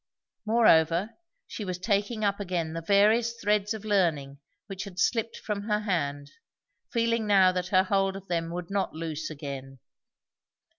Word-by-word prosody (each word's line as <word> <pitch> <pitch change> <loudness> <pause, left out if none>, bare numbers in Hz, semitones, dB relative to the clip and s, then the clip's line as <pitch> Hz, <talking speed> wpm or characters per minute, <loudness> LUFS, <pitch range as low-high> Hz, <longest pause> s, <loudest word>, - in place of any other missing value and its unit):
Moreover, 190 -4 +4 0.3
she 215 - -7
was 185 -2 -4
taking 205 +3 -1
up 200 0 0
again 175 -5 -2
the 165 - -4
various 215 +6 +3
threads 210 -1 +1
of 215 -1 -9
learning 160 -9 0 0.3
which 195 -2 -6
had 190 -3 -11
slipped 230 +4 0
from 210 -2 -4
her 210 0 +1
hand, 145 -8 -2 0.6
feeling 230 -2 0
now 190 -2 +5
that 180 0 -3
her 185 0 +4
hold 195 0 +1
of 195 0 -9
them 165 -1 -1
would 175 +1 -6
not 195 -5 -1
loose 160 -1 -4
again. 140 -3 -7
195 Hz, 155 wpm, -27 LUFS, 165-210 Hz, 0.6 s, now